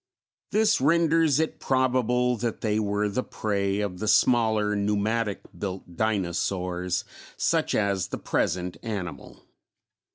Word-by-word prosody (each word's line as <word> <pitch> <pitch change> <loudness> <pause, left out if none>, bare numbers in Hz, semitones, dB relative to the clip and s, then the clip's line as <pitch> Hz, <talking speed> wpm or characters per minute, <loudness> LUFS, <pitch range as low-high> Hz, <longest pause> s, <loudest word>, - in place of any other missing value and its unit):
This 215 -3 +3
renders 165 -1 +3
it 160 - -1
probable 125 -1 +1
that 115 +1 -3
they 110 -1 +1
were 105 0 0
the 105 +5 -1
prey 100 -4 -1
of 95 -3 -3
the 110 - -3
smaller 110 -1 +3
pneumatic 105 +1 0
built 95 -3 -6
dinosaurs 90 -3 -1 0.3
such - - +1
as 100 -4 +1
the - - -5
present 90 +1 -1
animal. 100 -6 -6
105 Hz, 120 wpm, -26 LUFS, 100-125 Hz, 0.3 s, This